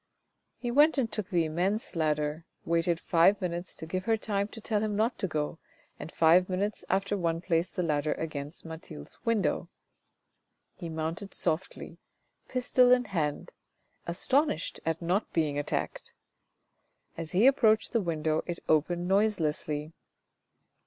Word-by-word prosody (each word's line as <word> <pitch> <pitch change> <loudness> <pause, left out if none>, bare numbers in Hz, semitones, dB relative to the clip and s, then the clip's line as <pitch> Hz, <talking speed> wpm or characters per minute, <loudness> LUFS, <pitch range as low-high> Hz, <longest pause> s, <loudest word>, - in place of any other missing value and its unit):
He 240 - -3
went 295 +4 +5
and 235 -5 0
took 205 -3 -3
the 175 -4 +2
immense 185 +7 -1
ladder, 150 0 -1 0.2
waited 170 0 +1
five 180 +5 +4
minutes 175 -1 -4
to - - -7
give 185 +3 -3
her 225 -1 +2
time 200 -2 -1
to 225 - -10
tell 215 -1 -1
him 215 -1 -1
not 225 +4 0
to 195 - 0
go, 155 0 -3 0.4
and - - -7
five 170 +3 +4
minutes 195 +3 -2
after 195 +2 +1
one 165 -3 0
placed 170 0 0
the 180 - 0
ladder 150 -2 +1
against 150 0 -6
Mathilde's 160 - -9
window. 230 -4 +1 1.0
He 170 - -7
mounted 165 +5 -3
softly, 175 -1 -3 0.5
pistol 250 0 +3
in 250 0 +5
hand, 150 -4 -1 0.6
astonished 195 - 0
at 165 +1 -1
not 185 +5 0
being 150 -3 +1
attacked. 145 - -3 1.0
As 165 -1 -5
he 195 +6 +4
approached 225 -5 +4
the 230 - +3
window 160 -3 0
it 175 -1 -3
opened 170 +3 +1
noiselessly. 160 -6 0
175 Hz, 145 wpm, -29 LUFS, 160-210 Hz, 1.0 s, went